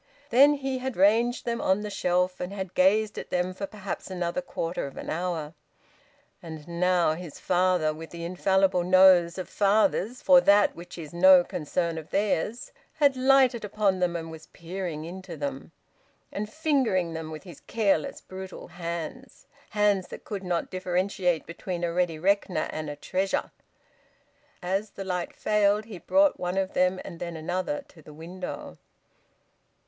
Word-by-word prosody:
Then 280 +5 +6
he 270 -2 -3
had 260 -3 -4
ranged 230 +6 +3
them 235 -1 -2
on 190 +2 +2
the 210 0 -5
shelf, 180 0 0
and 180 +1 -4
had 190 -2 -5
gazed 210 +3 +3
at - - -8
them 180 +1 -1
for 195 +1 -5
perhaps 205 -2 -6
another 180 +5 -2
quarter 170 - -4
of 135 - -12
an - - -5
hour. 165 -2 -3 0.9
And 160 -2 -9
now 175 -1 +2
his 165 -2 -8
father, 180 -3 +2
with 160 +1 -9
the 170 0 -7
infallible 185 +1 +2
nose 185 -1 +6
of 185 - -4
fathers 215 +3 +1
for 270 -1 +6
that 205 -3 +4
which 175 +1 -10
is 155 -2 -8
no 185 +1 +7
concern 165 +1 -2
of 160 - -12
theirs, 210 +3 -1 0.2
had 285 -3 +3
lighted 260 -2 +4
upon 205 -2 0
them 175 -1 0
and 165 -1 -5
was 160 -1 -11
peering 170 -2 -6
into 180 -1 -8
them, 140 0 -5 0.6
and 210 +1 -4
fingering 260 - +1
them 160 -1 -5
with 155 -1 -8
his 180 -3 -12
careless, 200 -9 0
brutal 190 0 -9
hands, 170 +8 -6 0.2
hands 205 -3 +2
that - - -10
could 200 -2 -5
not 175 -2 -2
differentiate 185 -1 0
between 175 +1 -5
a 170 -1 -1
ready 175 -2 0
reckoner 185 -2 +1
and 155 -1 -5
a 145 - -5
treasure. 190 +6 -2 1.1
As 195 +4 -1
the 195 - -7
light 180 -2 -2
failed, 210 0 +2
he 210 -5 -9
brought 290 - +3
one 180 +1 -2
of 190 -1 -1
them 185 0 +2
and 170 - -9
then 170 -1 -5
another 185 - -3
to 160 - -17
the 150 - -13
window. 180 +4 -7
185 Hz, 165 wpm, -27 LUFS, 170-205 Hz, 1.1 s, no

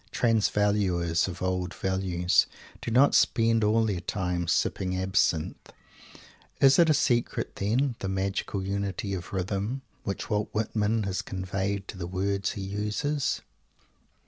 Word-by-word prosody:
Transvaluers 100 -7 +2
of 90 0 -6
old 90 -1 -1
values 95 -2 +1 0.3
do - - -4
not 130 +5 +5
spend 115 -1 +3
all 110 +2 +3
their 100 -5 -1
time 90 -2 -2
sipping 95 +2 0
absinthe. 95 -4 0 0.9
Is 135 +2 +6
it 170 -1 +6
a - - +6
secret 120 -4 0
still, 100 - -2
then, 135 -2 +1
the 95 - -3
magical 95 0 -2
unity 100 0 -2
of 90 -1 -5
rhythm, 100 +7 -2 0.2
which 100 - -4
Walt 105 -1 -1
Whitman 110 0 0
has 95 -1 -2
conveyed 95 +1 -3
to 95 - -8
the 85 - -4
words 95 +1 -1
he 100 - -6
uses? 105 +9 -1
100 Hz, 140 wpm, -27 LUFS, 95-110 Hz, 0.9 s, Is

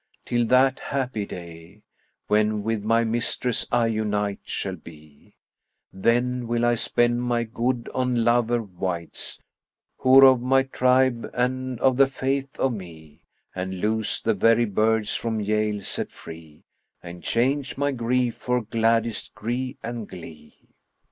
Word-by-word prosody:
till 120 -1 +1
that 130 +1 +4
happy 125 -7 -3
day 85 +3 -11 0.2
* - - -48
When 105 0 +1
with 110 -1 -1
my 115 +2 +2
mistress 115 +1 -1
I 120 -1 +3
unite 105 -2 -1
shall 95 -2 -4
be: 75 -3 -16 0.6
Then 120 +4 0
will 120 0 0
I 120 - +3
spend 120 +1 +1
my 120 -1 0
good 120 +1 -2
on 125 -2 0
lover 120 0 +2
wights, 90 -3 -5 0.3
* - - -58
Who're 135 +1 +7
of 130 -2 +6
my 135 +1 +3
tribe 130 -2 +1
and 130 0 -1
of 130 -2 +3
the 135 0 +6
faith 135 +1 -3
of 135 -2 +1
me; 80 -7 -11 0.3
And 95 0 -4
loose 110 +2 0
the 115 - +1
very 115 +3 +3
birds 110 +1 +1
from 110 -2 -2
jail 105 0 0
set - - -1
free, 80 -2 -12 0.2
* - - -46
And 85 0 -9
change 135 +4 0
my 145 +1 +1
grief 125 -1 0
for 125 -1 -1
gladdest 115 +1 0
gree 125 +4 -3
and 115 -2 -5
glee!'" 80 -4 -13
115 Hz, 150 wpm, -24 LUFS, 105-125 Hz, 0.6 s, Who're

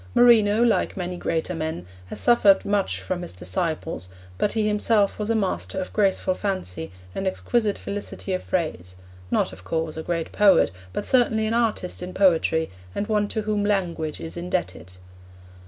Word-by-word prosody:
Marino, 225 -2 +6
like 230 -3 +1
many 180 -1 -3
greater 165 0 -2
men, 160 - -4 0.2
has - - -6
suffered 205 -5 +5
much 200 -1 0
from 180 -1 -3
his 175 - -5
disciples, 95 - -3 0.3
but 205 - +1
he 220 -2 +1
himself 210 -1 +2
was 210 +1 -2
a 230 - +2
master 195 -2 -1
of 185 - -5
graceful 195 -2 +2
fancy 185 - -4 0.2
and 195 - -2
of - - +3
exquisite 220 0 0
felicity 200 -1 -5
of 185 - -1
phrase; 90 - -3 0.3
not, - - +1
of 90 - -12
course, 160 - -2
a - - -3
great 165 0 -3
poet 205 - +5 0.2
but - - -3
certainly 230 -4 +3
an 220 - 0
artist 225 -7 0
in 180 +1 -6
poetry 165 - +3 0.2
and 205 - -1
one 210 -1 +1
to 215 +1 -3
whom 210 -1 0
language 175 -7 -1
is 160 - -7
indebted. 170 - -3
190 Hz, 170 wpm, -24 LUFS, 165-210 Hz, 0.3 s, Marino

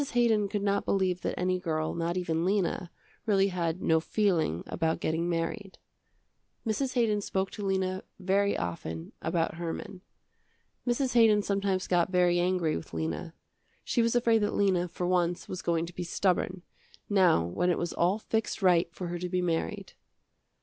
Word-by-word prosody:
Haydon 225 -4 +3
could 200 0 -2
not 200 0 +1
believe 185 -2 0
that - - -3
any 185 0 +1
girl 155 -3 -1
not 170 +1 -2
even 165 -2 -1
Lena, 185 -2 0 0.4
really 200 -2 +3
had 175 -1 -2
no 160 0 +4
feeling 165 - 0
about 160 -1 -1
getting 165 +2 -1
married. 175 +4 -3 0.9
Mrs. 255 +5 -1
Haydon 220 -4 +2
spoke 190 -1 -2
to 210 - -6
Lena 190 -1 0 0.2
very 200 +2 +1
often 80 -2 -5
about 165 -1 -1
Herman. 175 +2 -5 0.9
Mrs. 250 +1 +1
Haydon 220 -3 +5
sometimes 195 -2 0
got 175 0 +2
very 180 -1 +3
angry 175 -3 +1
with 80 - -7
Lena. 80 - -3 0.5
She 240 - +1
was 230 +1 +1
afraid 235 -2 +4
that 205 -1 0
Lena, 185 -3 +2
for 175 +1 -4
once, 175 -1 0
was 185 - -5
going 170 -1 0
to 175 - -10
be 180 - -4
stubborn, 180 0 0 0.4
now 185 - +4
when 175 - 0
it 175 - +2
was 175 - -2
all 180 +4 +2
fixed 220 -1 -2
right 175 -2 +4
for 180 - -5
her 175 0 -3
to 180 +1 -3
be 180 0 0
married. 165 -2 -2
180 Hz, 170 wpm, -29 LUFS, 170-200 Hz, 0.9 s, Haydon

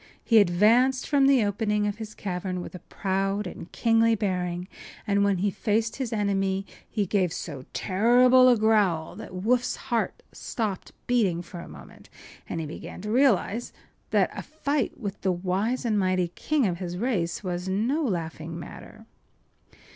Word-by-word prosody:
He 225 -2 +5
advanced 225 +8 +4
from 280 -2 +4
the 265 -6 +4
opening 210 0 0
of 205 0 -2
his 215 -1 -8
cavern 185 -1 -3
with 175 - -7
a 180 - -8
proud 195 +3 -2
and 180 - -8
kingly 230 -1 +3
bearing, 180 -3 -2 0.4
and 200 0 +2
when 200 -2 +2
he 200 +3 0
faced 220 +3 -1
his 260 -4 -3
enemy 195 -2 0 0.2
he 210 -3 -1
gave 185 -2 +1
so 140 -6 -6
terrible 250 +6 +5
a 245 - +5
growl 210 -7 +2
that - - -9
Woof’s 240 +7 0
heart 235 -1 -2
stopped 210 -5 -4
beating 200 -9 +1
for 175 0 -9
a - - -9
moment, 70 -4 -14 0.4
and - - -3
he 160 - -3
began 155 - -8
to 210 +2 -4
realize 240 -3 +2 0.4
that - - +2
a - - -5
fight 290 -3 -2
with 205 -4 -5
the 190 - +1
wise 190 +8 -1
and 215 -3 +2
mighty 185 -2 +1
king 290 - 0
of 175 -3 -1
his 180 -1 -4
race 195 -6 -1
was 180 0 -3
no 235 +11 0
laughing 165 - -3
matter. - - -11
205 Hz, 165 wpm, -26 LUFS, 180-230 Hz, 0.4 s, He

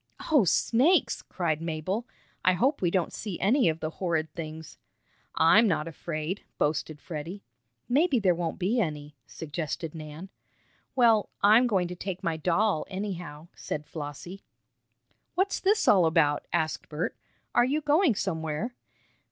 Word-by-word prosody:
"Oh, 285 -10 +5
snakes!" 260 - +3
cried 160 -4 -2
Mabel. 170 +8 -3 0.4
"I 185 - +5
hope 255 - +1
we 175 - +2
don't 180 -1 0
see 200 -6 -5
any 230 0 +3
of 160 0 -3
the 155 - -2
horrid 160 -3 -2
things!" 160 -1 -8 0.6
"I'm 210 +8 +6
not 165 -4 0
afraid!" 165 +3 -4
boasted 150 0 -1
Freddie. 170 +6 -7 0.4
"Maybe 285 +2 +3
there 195 -5 +3
won't 170 -1 -3
be 200 +7 +1
any," 150 -4 -4
suggested 155 +1 -5
Nan. 155 +3 -8 0.7
"Well, 230 -5 +4
I'm 220 +5 +6
going 190 -6 +1
to 180 - -6
take 185 0 -5
my 165 -1 0
doll, 175 +3 +1
anyhow," 175 -5 -6
said 150 0 -5
Flossie. 155 +6 -7 0.9
"What's 385 +2 +1
this 410 +2 +2
all 185 -5 +6
about?" 155 -3 +2
asked 160 -2 -1
Bert. 155 +3 -3 0.4
"Are - - +5
you 275 +5 +1
going 300 - +3
somewhere?" 160 +4 -2
175 Hz, 145 wpm, -28 LUFS, 155-215 Hz, 0.9 s, I'm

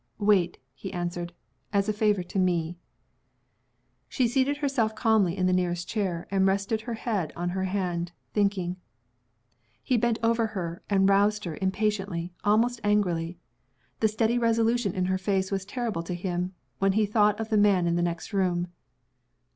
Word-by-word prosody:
"Wait," 200 -4 +2 0.2
he 190 +8 -7
answered, 175 -1 -3 0.4
"as 200 0 +1
a 215 - +1
favor 210 -3 +2
to 185 +2 -3
me." 175 -2 +1 1.3
She 255 -3 +1
seated 265 +4 +1
herself 270 -7 0
calmly 215 -5 +2
in 185 - +1
the 185 - +3
nearest 175 -1 0
chair, 185 -6 -2
and 195 -1 +3
rested 200 +3 0
her 235 0 -4
head 210 -8 -2
on 175 +1 -2
her 190 +1 -1
hand, 180 -3 -2 0.2
thinking. 195 -4 0 1.1
He 255 - +2
bent 230 0 +1
over 230 0 +2
her, 170 -1 -4
and 195 -1 +4
roused 205 +2 +3
her, 165 -3 -4
impatiently, 190 -3 -1
almost 230 +3 +2
angrily. 180 -5 +1 0.6
The 220 - +4
steady 225 +2 +1
resolution 230 -2 +2
in 185 -1 0
her 185 0 0
face 190 0 0
was 195 -1 -2
terrible 225 -4 -3
to 175 +1 -4
him, 180 +1 -3 0.2
when 195 0 +3
he 215 +1 +3
thought 210 0 +3
of 220 0 -3
the 220 - +1
man 200 -4 +4
in 170 0 +1
the 175 - +1
next 175 +4 -3
room. 180 -3 +1
195 Hz, 165 wpm, -27 LUFS, 180-215 Hz, 1.3 s, and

